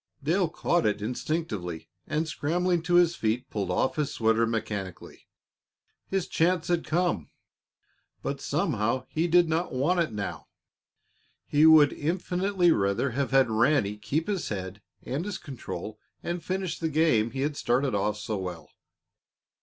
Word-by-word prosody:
Dale 170 +4 +2
caught 175 -1 +1
it 105 0 0
instinctively, 110 - -3 0.2
and, 155 +2 -1
scrambling 175 +3 0
to 175 +1 +1
his 175 -1 +5
feet, 115 +3 -1
pulled 100 -4 -2
off 90 +11 0
his 150 -2 0
sweater 115 0 +2
mechanically. 105 -5 -5 0.8
His 190 -2 -1
chance 170 0 +1
had 175 -2 +1
come, 170 - 0 0.9
but - - -3
somehow 115 +5 0
he 165 +2 0
did 175 0 +5
not 160 +3 -1
want 165 +8 +2
it 165 -7 +1
now. 105 -2 -5 1.0
He 150 +2 +4
would 155 -3 +7
infinitely 180 +3 +1
rather 100 +3 +1
have 140 +3 -1
had 135 -4 +4
Ranny 115 -2 +2
keep 110 +10 -2
his 200 -4 -2
head 95 0 -5 0.2
and 140 +6 -3
his 205 -1 -4
control 110 - -7 0.2
and 175 0 -3
finish 185 -3 -3
the 160 - -1
game 150 -8 +3
he 135 +2 -4
had 145 +1 -1
started 130 0 +1
off 105 +1 0
so 105 0 -3
well. 90 -3 -6
145 Hz, 150 wpm, -27 LUFS, 110-170 Hz, 1.0 s, would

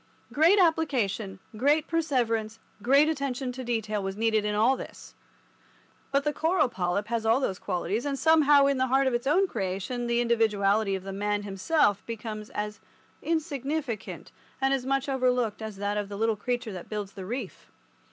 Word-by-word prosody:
Great 330 +7 +5
application, 255 - +1 0.2
great 290 +7 +2
perseverance, 235 -9 0 0.2
great 275 +6 +5
attention 275 -4 -2
to 255 +1 -7
detail 220 -3 -2
was 195 0 -4
needed 220 -1 +1
in 210 0 -1
all 225 +6 +4
this, - - -10 1.0
but 280 0 +2
the 300 0 0
coral 320 -1 +2
polyp 185 0 -1
has 230 -1 -1
all 225 +3 +3
those 190 -9 -2
qualities, 200 +4 -2
and 280 -1 -2
somehow 295 -2 +5
in 275 -1 +1
the 260 - +2
heart 265 +2 +3
of 260 - +1
his 240 +2 -1
own 365 +7 +4
creation 200 - -3
the 235 0 +1
individuality 215 -3 +2
of 190 - -6
the 195 0 -6
man 205 +1 -1
himself 205 +2 +1
becomes 215 -2 -6
as 210 0 -4 0.4
insignificant 295 -6 -3 0.3
and 270 0 +2
as 260 -1 -2
much 275 0 0
overlooked 250 -5 0
as 220 -2 -6
that 205 +1 -2
of 205 -1 -3
the 200 - -6
little 225 +1 +1
creature 240 +2 -3
that 180 -2 -8
builds 210 -2 -4
the 190 - -8
reef. 235 -2 -6
235 Hz, 175 wpm, -27 LUFS, 210-275 Hz, 1.0 s, Great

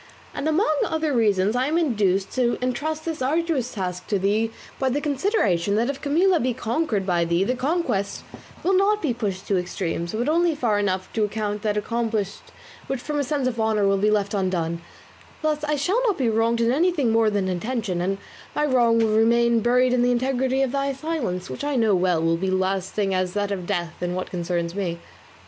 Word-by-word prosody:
And 310 - -2
among 315 0 +2
other 315 -2 -1
reasons, 210 -3 +2
I 255 +2 +1
am 315 +3 +1
induced 205 - +1
to 245 -2 +1
entrust 295 +5 -2
this 325 -4 -4
arduous 290 -2 0
task 180 -3 -4
to 205 - +1
thee 210 +4 +1 0.3
by 265 - +1
the 270 +3 0
consideration 260 - +1
that 235 +5 +1
if 275 0 -10
Camilla 340 +5 +3
be 250 -1 0
conquered 230 -4 -1
by 175 -2 +1
thee 170 +2 +1
the 245 - 0
conquest 265 - -1 0.4
will 380 - +2
not 400 +3 +3
be 275 -6 +1
pushed 200 -5 -3
to 195 -3 +2
extremes, 175 -1 -3
but 240 +4 -1
only 335 +1 +2
far 225 -7 +1
enough 190 -2 -2
to 220 - +1
account 210 0 -2
that 210 -1 0
accomplished 220 -2 -2 0.5
which 270 -2 -2
from 295 +3 -3
a - - +1
sense 275 -1 -1
of 235 -3 -2
honour 220 -2 +2
will 195 0 +2
be 210 +2 +3
left 205 -1 +1
undone; 175 -4 -1 0.6
thus 305 -1 0
I 300 0 0
shall 365 - +1
not 410 - +1
be 255 -4 +1
wronged 230 +1 +1
in 230 0 +3
anything 300 -4 +2
more 225 -1 +3
than 200 -2 0
intention, 190 -1 -2
and 195 +2 -1 0.4
my 300 - +1
wrong 240 -4 +3
will 220 -1 +2
remain 235 +1 +4
buried 250 +2 +3
in 250 - +2
the 245 - +3
integrity 260 +1 +1
of 265 - -1
thy 275 0 -1
silence, 265 - -3
which - - -6
I 290 -1 -1
know 225 -4 +3
well 180 -3 +2
will 165 0 +2
be 190 +3 -2
as 185 - 0
lasting 190 +1 0
as 185 -1 0
that 205 0 -1
of 185 -3 -4
death 175 -4 -3
in 180 0 -2
what 185 - -4
concerns 170 -1 -2
me. 180 -4 -3
225 Hz, 210 wpm, -23 LUFS, 195-275 Hz, 0.6 s, remain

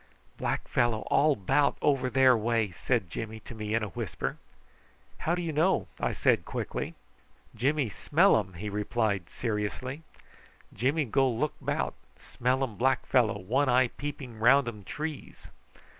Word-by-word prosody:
"Black - - -2
fellow 120 -3 +1
all 150 0 +4
'bout 140 +9 +2
over 135 -3 +2
there 130 0 +5
way!" 115 -2 0
said 110 +2 -1
Jimmy 110 0 -5
to - - -10
me 105 -1 -3
in 115 - +1
a 105 - -3
whisper. 85 - -4 0.8
"How 170 - 0
do 175 - -3
you 165 - -2
know?" 155 - +2
I - - 0
said - - +2
quickly. - - -4 0.6
"Jimmy 135 +4 +1
smell 165 - +3
am!" 100 -4 -1
he 100 +6 -5
replied 105 -2 -1
seriously. 120 +5 -3 0.7
"Jimmy 140 +6 +1
go 135 +2 +2
look 130 +6 -1
'bout. - - -1 0.2
Smell 130 +2 -1
um 115 -6 -4
black 130 +1 +2
fellow, 115 -5 +2
one 130 +9 +1
eye 125 0 +4
peeping 135 -5 -7
round 130 +3 +5
um 105 -3 -6
trees." 150 +6 -6
120 Hz, 155 wpm, -29 LUFS, 110-140 Hz, 0.8 s, there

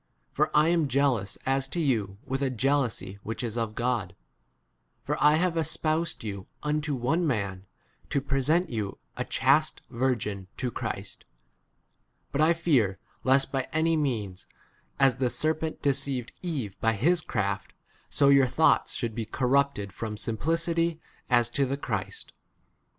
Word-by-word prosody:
For - - +2
I 155 +2 +5
am 170 -3 +2
jealous 130 -7 +1
as 135 0 +1
to 170 - -3
you 110 - 0
with 135 0 -2
a 135 - +1
jealousy 125 -6 0
[whijh 110 +3 -4
is] 115 -2 -3
of 115 -2 -2
God; 120 -7 -1 0.9
for - - -1
I 150 +1 +7
have 175 +2 +2
espousad 160 -1 -1
you 100 -3 -5 0.2
unto 150 -1 0
one 160 +8 +1
man, 100 -7 -2 0.4
to 140 - +1
present 140 +6 +1
[you] 105 -4 -3 0.2
a - - -2
chaste - - +2
virgin 115 -6 -1
to 125 -2 -2
3 - - -25
Christ. - - -5 1.1
But 140 - 0
I 160 +2 +5
fear 130 - +2 0.3
lest 135 +1 +3
by 135 -2 -1
any 160 +1 +2
means, 110 -11 -2 0.5
as 135 -3 +4
the 130 -2 +1
serpent 155 +3 -1
deceived 135 -3 0
Eve 135 - -4
by 115 0 +3
his 160 - +2
craft, 100 -7 -2 0.4
so 140 -1 +4
your 140 -2 +6
thoughts 155 +6 +3
should 115 -3 -3
be 115 0 -3
corrupted 125 -4 +1
from 110 0 -4
simpli 110 0 -2
4 165 +1 +3
city 165 0 +1
h 165 -1 -10 0.3
as 120 -2 +4
to 140 +2 +2
the 135 +2 -2
Christ. 105 -8 -4
130 Hz, 160 wpm, -27 LUFS, 110-150 Hz, 1.1 s, I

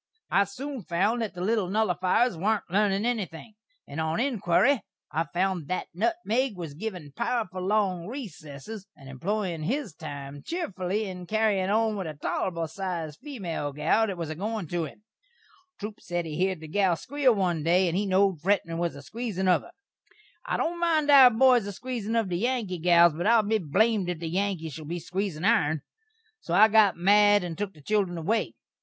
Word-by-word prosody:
I 200 - +4
soon 260 +6 -6
found 200 +7 0
that 220 -5 -3
the 175 - -6
little 205 -1 +1
nullifiers 195 +2 +2
warn't 210 +5 0
lernin' 200 +1 +2
enything, 215 -4 -3 0.3
and 150 +3 -4
on 160 +4 -1
inquiry 245 0 +2 0.3
I 160 +2 0
found 175 -2 -1
that 185 - -3
nutmeg 255 - 0
was 165 -4 -6
a - - -13
givin' 180 -7 -6
powerful 190 -7 -2
long 185 -3 0
recessess, 200 - -8
and 135 -2 -15
employin' 175 +5 -3
his 225 - -2
time 145 -3 -8
cheefly 205 - -3
in 180 -2 -7
carryin' 210 -2 +1
on 220 +1 +2
with 190 -4 -4
a 155 - -6
tolerbul 165 +3 -2
sized 165 -4 -5
female 175 - -4
gal 155 +10 +2
that 195 -3 -4
was 165 -2 -4
a - - -4
goin' 210 +2 -3
to 175 -2 -1
him. 205 +7 -12 0.8
Troup 210 0 -6
sed 175 -1 -3
he 155 -2 -5
heerd 185 0 0
the 160 - -8
gal 190 +1 +2
squeel 265 - +1
one 180 -5 0
day, 175 +4 +3
and 170 - -1
he 200 +2 0
knowed 190 -3 +2
Fretman 170 -3 0
was 170 -3 -1
a 140 - -10
squeezin' 215 - -3
of 180 - +4
her. - - -15 0.8
I - - 0
don't 345 +1 -1
mind 315 -4 +2
our 270 -3 +10
boys 245 -2 +4
a - - -3
squeezin' 230 0 -4
of 225 -3 +1
the 175 -1 -2
Yankee 225 -6 -1
gals, 170 -1 +5
but 175 +5 -2
I'll 230 -1 +5
be 215 +1 +1
blamed 195 +4 +1
if 175 - -2
the 165 0 -5
Yankees 180 -4 -2
shall 155 +1 -8
be 170 +4 -4
a - - -5
squeezin' 180 -1 -3
ourn. 155 -7 +2 0.6
So 170 - -3
I 215 +3 +7
got 210 -4 +5
mad 205 +2 +5
and 170 -2 -4
took 195 +1 -4
the 150 - -16
children 195 -1 0
away. 210 +8 -1
190 Hz, 195 wpm, -27 LUFS, 170-220 Hz, 0.8 s, our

